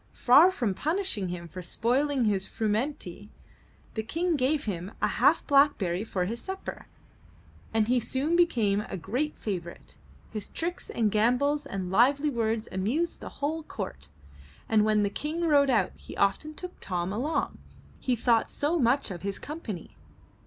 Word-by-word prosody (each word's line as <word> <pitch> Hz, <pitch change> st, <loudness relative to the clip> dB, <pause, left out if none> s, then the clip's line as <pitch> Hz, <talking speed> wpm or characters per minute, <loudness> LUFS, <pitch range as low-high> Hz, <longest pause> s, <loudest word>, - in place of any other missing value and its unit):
Far 285 Hz, +9 st, +7 dB
from 240 Hz, -, -1 dB
punishing 315 Hz, -, -1 dB
him 175 Hz, -1 st, -5 dB
for 180 Hz, +3 st, -8 dB
spoiling 255 Hz, +8 st, +1 dB
his 195 Hz, -3 st, +1 dB
frumenty, 215 Hz, -, -2 dB, 0.6 s
the 220 Hz, -, -1 dB
King 330 Hz, +9 st, 0 dB
gave 285 Hz, +2 st, +1 dB
him 190 Hz, -1 st, -4 dB
a -, -, +2 dB
half -, -, +3 dB
blackberry 250 Hz, -, +3 dB
for 185 Hz, -5 st, -2 dB
his 230 Hz, +5 st, -4 dB
supper, 380 Hz, 0 st, -6 dB, 0.8 s
and 220 Hz, -1 st, +2 dB
he 250 Hz, +1 st, +3 dB
soon 275 Hz, +7 st, 0 dB
became 230 Hz, -, +3 dB
a 190 Hz, -, -4 dB
great 255 Hz, -, -2 dB
favorite. 175 Hz, -5 st, -6 dB, 0.3 s
His 215 Hz, -2 st, -4 dB
tricks 345 Hz, +2 st, -4 dB
and 220 Hz, -3 st, +1 dB
gambols 265 Hz, +7 st, +2 dB
and 190 Hz, -6 st, -4 dB
lively 275 Hz, +8 st, +4 dB
words 225 Hz, -2 st, -1 dB
amused 245 Hz, -, -1 dB
the -, -, -7 dB
whole 310 Hz, +3 st, -2 dB
court, 70 Hz, -, -7 dB, 0.6 s
and 215 Hz, -1 st, +4 dB
when 215 Hz, -1 st, +3 dB
the 200 Hz, -, 0 dB
King 310 Hz, +8 st, -3 dB
rode 290 Hz, -4 st, +4 dB
out, 235 Hz, -4 st, +2 dB
he -, -, -11 dB
often 200 Hz, +11 st, +1 dB
took 360 Hz, +2 st, -8 dB
Tom 180 Hz, 0 st, -2 dB
along, 270 Hz, +9 st, -1 dB, 0.4 s
he 255 Hz, -, 0 dB
thought 230 Hz, -1 st, +2 dB
so 315 Hz, +4 st, 0 dB
much 245 Hz, -2 st, +2 dB
of 175 Hz, -, -6 dB
his 200 Hz, 0 st, -3 dB
company. 250 Hz, -, -7 dB
235 Hz, 160 wpm, -28 LUFS, 200-295 Hz, 0.8 s, Far